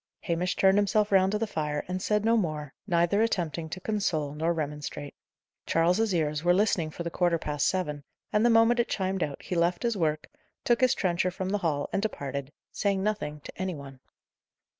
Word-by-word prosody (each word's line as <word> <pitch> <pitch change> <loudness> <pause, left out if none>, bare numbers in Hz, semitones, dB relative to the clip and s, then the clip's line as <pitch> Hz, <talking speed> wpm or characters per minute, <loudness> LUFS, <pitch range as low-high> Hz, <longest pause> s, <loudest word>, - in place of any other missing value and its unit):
Hamish 175 +1 -1
turned 195 +1 +4
himself 205 +1 +2
round 190 -1 +4
to 210 - +1
the 225 - -1
fire, 150 -7 -3
and 185 +1 -3
said 210 +1 +1
no 230 +1 +4
more, 155 -9 -2
neither 175 +3 +2
attempting 170 -7 -1
to 185 - -5
console 175 -8 -1
nor 160 +3 0
remonstrate. 150 -2 -4 0.5
Charles's 180 +7 +2
ears 150 -2 0
were 175 0 +4
listening 185 -5 +2
for 170 - -6
the 170 - -4
quarter 175 -1 +2
past 150 -2 -1
seven, 150 -6 -1 0.3
and, 210 - +3
the 240 - +5
moment 230 +1 +5
it 235 - +1
chimed 190 -1 -1
out, 145 -3 -3
he - - -5
left 175 +3 +1
his 235 -2 +1
work, 155 -4 -1 0.4
took 240 0 +2
his 255 -1 +4
trencher 180 -1 +1
from 185 +1 -4
the 205 +1 0
hall, 150 -5 -1
and 195 - +1
departed, 140 -9 -4 0.2
saying 200 -2 0
nothing 175 -8 -2
to - - -10
any 185 -2 -2
one. 135 -2 -10
175 Hz, 200 wpm, -28 LUFS, 155-205 Hz, 0.5 s, the